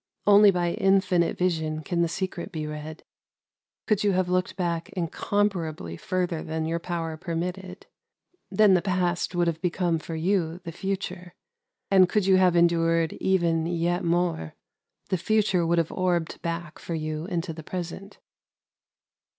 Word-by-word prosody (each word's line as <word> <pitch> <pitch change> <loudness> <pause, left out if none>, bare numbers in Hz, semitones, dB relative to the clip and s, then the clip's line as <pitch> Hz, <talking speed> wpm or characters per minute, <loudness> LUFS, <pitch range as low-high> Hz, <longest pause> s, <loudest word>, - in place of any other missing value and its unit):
" - - -47
Only 205 0 +8
by 175 -2 +1
In 195 +2 +3
finite 180 -3 0
Vision 160 -3 -1
can 170 +1 -1
the 170 - +3
Secret 185 +2 -4
be 155 -3 -4
read. 150 +1 -7 0.8
Could 215 -3 +1
you 205 -1 +3
have 185 -1 +1
looked 180 +1 0
back 170 -3 -2
incomparably 170 - -1
further 175 - -2
than 160 0 -3
your 165 +1 -1
power 165 -2 -4
permitted, 180 +3 -5 0.6
then 200 +1 +5
the 180 - +4
Past 180 -2 -1
would 175 0 +2
have 165 -1 -2
become 175 -2 0
for 160 +1 -6
you 170 0 0
the 165 - -6
Future. 185 -1 -5 0.6
And 185 -2 +6
could 210 -3 +1
you 190 -1 +5
have 185 -2 +4
endured 165 -1 +3
even 170 -4 +1
yet 175 +1 0
more, 170 - 0 0.5
the 185 - 0
Future 195 -4 +2
would 170 +1 +2
have 165 -1 +1
orbed 175 -3 -1
back 170 -1 -4
for 170 - -5
you 155 0 -3
into 170 -2 -3
the 160 - -8
Present." 180 +4 -6
175 Hz, 160 wpm, -26 LUFS, 165-185 Hz, 0.8 s, Only